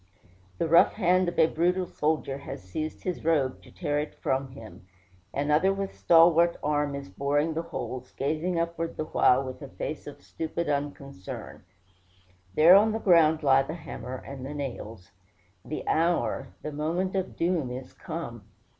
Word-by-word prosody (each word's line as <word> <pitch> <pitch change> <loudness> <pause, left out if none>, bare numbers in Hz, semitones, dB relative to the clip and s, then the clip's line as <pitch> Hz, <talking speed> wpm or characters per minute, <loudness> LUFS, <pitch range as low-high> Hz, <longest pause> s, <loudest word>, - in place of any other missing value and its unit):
The 165 - 0
rough 170 +2 +6
hand 185 -2 +2
of 175 - -9
a 160 - +7
brutal 180 +3 +1
soldier 150 -4 -1
has 140 - -8
seized 155 +12 -5
his 180 -2 -3
robe 145 -5 +1
to - - -16
tear 145 -4 -2
it 150 - -4
from 135 +1 -1
him. 110 -6 -12 0.4
Another 150 +6 +2
with 195 0 -3
stalwart 170 0 +5
arm 145 -1 0
is 140 - -6
boring 145 +10 0
the 160 - -1
holes, 130 -6 -6
gazing 160 +5 -1
upward 165 0 -3
the 155 - -2
while 130 -3 +3
with 130 -1 -7
a - - -7
face - - -6
of - - -10
stupid 160 - -4
unconcern. 140 -7 -5 0.9
There 165 +4 +8
on 215 +2 +5
the - - 0
ground 160 -5 +4
lie 135 -1 +5
the 150 +4 -5
hammer 130 -6 -7
and 135 -1 -8
the 140 +3 -6
nails: 115 -9 -6 0.5
the 155 - -6
hour, 170 +1 +1 0.2
the 150 - -4
moment 170 +6 -1
of 190 -1 -2
doom 170 -6 0
is 125 +1 -7
come! 120 -10 -7
155 Hz, 165 wpm, -27 LUFS, 135-170 Hz, 0.9 s, There